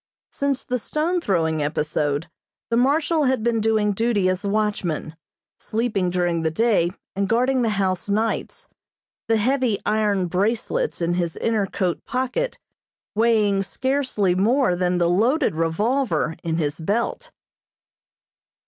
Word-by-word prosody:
Since 280 -1 -1
the 250 0 -2
stone 330 +9 -1
throwing 160 - 0
episode 150 0 -1 0.4
the - - +3
Marshal 295 +5 +2
had 260 -4 +1
been 230 -1 +1
doing 215 -1 +2
duty 210 -2 +1
as 185 +2 -2
watchman, 200 -7 -1 0.4
sleeping 215 -5 -1
during 175 -2 0
the 160 - +1
day 195 -1 +2 0.3
and 195 0 -1
guarding 255 +3 +2
the 230 - +1
house 185 -1 -1
nights, 220 +2 -1 0.6
the 225 - +3
heavy 250 -1 +1
iron 210 -3 +1
"bracelets" 220 - -1
in 170 +1 +1
his 175 -2 -1
inner 220 -3 0
coat 185 -3 -2
pocket 260 - -2 0.6
weighing 215 -3 +3
scarcely 255 -4 0
more 220 +2 +2
than 180 0 0
the 175 -1 +2
loaded 235 - +2
revolver 165 - 0
in 165 -1 -1
his 150 -1 -2
belt. 215 - -2
210 Hz, 130 wpm, -23 LUFS, 175-245 Hz, 0.6 s, the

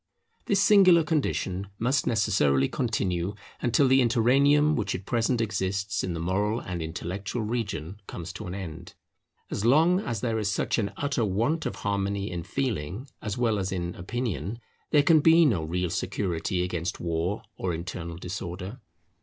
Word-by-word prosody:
This 200 -1 +3
singular 185 -5 +7
condition 100 - -1
must 130 +5 +1
necessarily 70 - +3
continue 100 -6 -1 0.3
until 125 +3 +3
the 130 +1 +5
interregnum 140 +6 +4
which 105 -3 -1
at 95 - -7
present 120 +1 +1
exists 100 -1 -1
in 90 - -2
the 85 - -4
moral 100 +6 0
and 90 -6 -5
intellectual 90 +7 -4
region 105 -5 -3
comes 85 -2 -7
to - - -7
an 90 - -5
end. 85 -3 -8 0.6
As 100 - -2
long 160 +9 +5
as 115 - -3
there 115 -2 0
is 105 -1 0
such 105 - 0
an 100 -2 -1
utter 140 -4 0
want 115 - 0
of - - -4
harmony 100 0 -1
in 85 -1 -3
feeling 110 - -3
as 105 0 -4
well 115 -4 +1
as 95 -1 -2
in 90 -2 -3
opinion, 115 +2 -3 0.3
there 145 -1 +5
can 160 +1 +6
be 165 +2 +6
no 110 - +2
real 90 +2 -2
security 90 0 -1
against 90 0 -3
war 85 +4 -2
or 95 - -2
internal 85 0 -5
disorder. 90 +5 -6
100 Hz, 160 wpm, -27 LUFS, 90-125 Hz, 0.6 s, singular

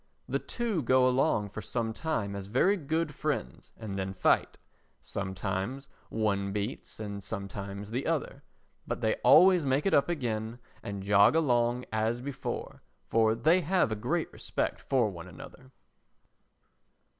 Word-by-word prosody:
The - - 0
two 230 -8 -2
go 130 0 +4
along 125 -5 +2
for - - -7
some 115 -2 -2
time 110 -10 -2
as 100 -1 -5
very 135 - +3
good 160 -2 -2
friends 140 - -3
and 100 -3 -5
then 95 0 -3
fight; - - +2 0.4
sometimes 100 +7 -4 0.2
one 100 -3 0
beats 105 +3 -4
and 100 -2 -5
sometimes 100 +1 -6
the 125 +4 -2
other, 150 -3 -2 0.5
but - - -3
they - - +2
always 180 +1 +7
make 135 +1 +1
it 195 - +2
up 140 - +4
again 115 -7 -2 0.2
and 100 -1 -5
jog 100 +7 +5
along 125 -5 +2
as 110 +2 0
before, 135 +1 -5 0.2
for 110 -1 +3
they 160 +10 +3
have 180 -7 +2
a - - 0
great 105 - -2
respect - - -2
for 130 -5 +2
one 85 -1 -9
another. 110 +9 -12
115 Hz, 145 wpm, -30 LUFS, 100-140 Hz, 0.5 s, always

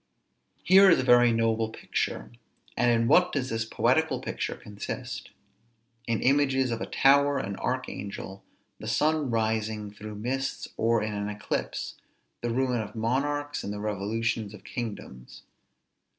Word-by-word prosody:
Here 195 +1 +7
is 170 - +6
a - - +1
very 120 -1 +6
noble 115 -1 +1
picture; - - -3 0.4
and 120 - +3
in 115 -1 +3
what 180 +6 +5
does 130 -3 -2
this 115 0 -1
poetical 130 +5 +1
picture - - -3
consist? 105 -1 -6 0.8
In 115 -2 0
images 135 -2 +3
of 115 - -3
a - - -3
tower, 140 +1 +4
an 100 -6 -3
archangel, 100 -1 -4 0.4
the - - -7
sun 155 -2 +1
rising 110 -2 -1
through 105 +1 -9
mists, 130 +5 -3
or 115 -1 +2
in 105 0 -3
an 100 0 -3
eclipse, 105 0 -4 0.4
the 120 - -1
ruin 125 0 +1
of 105 +1 -8
monarchs 145 +6 -1
and 100 - -4
the 105 - -5
revolutions 105 +1 -2
of 105 - -15
kingdoms. 105 - -7
115 Hz, 145 wpm, -27 LUFS, 105-135 Hz, 0.8 s, Here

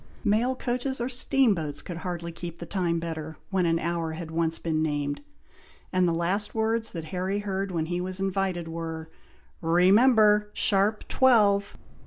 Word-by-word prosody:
Mail 235 +5 +2
coaches 255 +1 -2
or 240 +2 -2
steamboats 215 - +1
could 175 - -6
hardly 170 -1 -5
keep 170 0 -7
the 170 - -7
time 170 -1 -1
better, 160 -2 -5
when 185 -3 +2
an 165 0 +2
hour 165 -1 -2
had 160 0 -7
once 165 0 0
been 160 -2 -1
named, 145 -2 -2 0.7
and 185 -1 +3
the - - +2
last 185 +6 -1
words 225 +1 +1
that 165 -3 -5
Harry 185 +2 -1
heard 200 -1 -2
when 165 -3 -1
he 175 +2 -2
was 185 +1 -3
invited 190 -3 -1
were, 165 -1 -6 0.5
"Remember! 210 +5 +5
sharp 205 +2 +2
twelve." 205 -6 +3
180 Hz, 160 wpm, -27 LUFS, 165-210 Hz, 0.7 s, Remember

